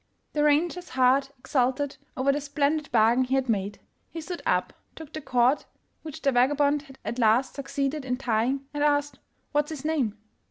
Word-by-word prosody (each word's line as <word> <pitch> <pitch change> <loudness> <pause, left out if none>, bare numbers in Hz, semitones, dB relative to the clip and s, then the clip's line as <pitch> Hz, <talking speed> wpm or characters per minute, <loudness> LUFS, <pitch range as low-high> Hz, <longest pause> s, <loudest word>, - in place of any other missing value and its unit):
The 295 - +1
ranger's 335 +4 +1
heart 260 +2 +3
exulted 260 +2 0 0.2
over 265 +2 +3
the 290 +1 -1
splendid 290 +1 -1
bargain 235 +2 +4
he 260 +1 0
had 265 -1 0
made. 205 -3 -1 0.3
He 330 - -7
stood 345 +2 -6
up, - - +1 0.2
took 320 -2 -11
the 310 - -5
cord 250 +1 +2 0.4
which 310 -3 -9
the 275 - +3
vagabond 285 +3 +3
had 270 -2 -15
at 240 - -3
last 235 +3 +3
succeeded 280 +1 -2
in 250 -1 -2
tying, 250 +2 0
and 290 0 -1
asked 290 -1 +1 0.2
" - - -45
What's 295 0 +1
his 305 -3 -7
name? 270 -10 0
275 Hz, 185 wpm, -26 LUFS, 250-295 Hz, 0.4 s, bargain